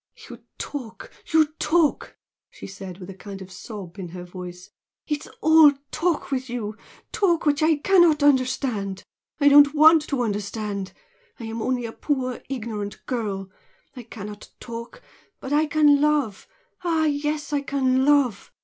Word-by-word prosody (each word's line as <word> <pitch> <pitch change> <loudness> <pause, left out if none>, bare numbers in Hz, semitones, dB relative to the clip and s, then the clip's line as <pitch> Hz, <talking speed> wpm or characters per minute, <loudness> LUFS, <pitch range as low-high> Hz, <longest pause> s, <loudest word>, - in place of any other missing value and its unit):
"You - - -12
talk, 245 -6 -7 0.2
you 320 -1 +5
talk!" 315 -1 +1 0.3
she - - -11
said, 190 -2 -9
with 190 0 -9
a - - -9
kind 195 +1 -9
of 190 -1 -11
sob 190 0 -9
in 185 - -5
her 175 +1 -8
voice 180 0 -10 0.3
"It 295 -1 -3
is - - -15
all 315 -2 +7 0.2
talk 330 -2 -1
with 260 -1 -2
you 220 -3 -4 0.4
talk 345 -6 +1
which 295 +1 +2
I 315 0 +4
cannot 330 -2 +4
understand! 250 -8 +1 0.4
I 285 - +4
don't 285 +1 +7
WANT 315 +1 +7
to 270 -4 -1
understand! 205 -2 -3 0.5
I - - -8
am 225 0 -5
only 250 0 -1
a 225 - -5
poor, 255 -2 -2
ignorant 215 -6 -5
girl. 200 -6 -3 0.4
I 250 - -7
cannot 210 -2 -9
talk 235 - -9 0.4
but 265 - -5
I 305 +1 +3
can 295 -2 +4
love! 295 -9 0 0.4
Ah 325 -2 +1
yes, 295 0 -2
I 285 - +1
can 265 -2 +1
love! 280 -7 +2
255 Hz, 160 wpm, -24 LUFS, 205-295 Hz, 0.5 s, all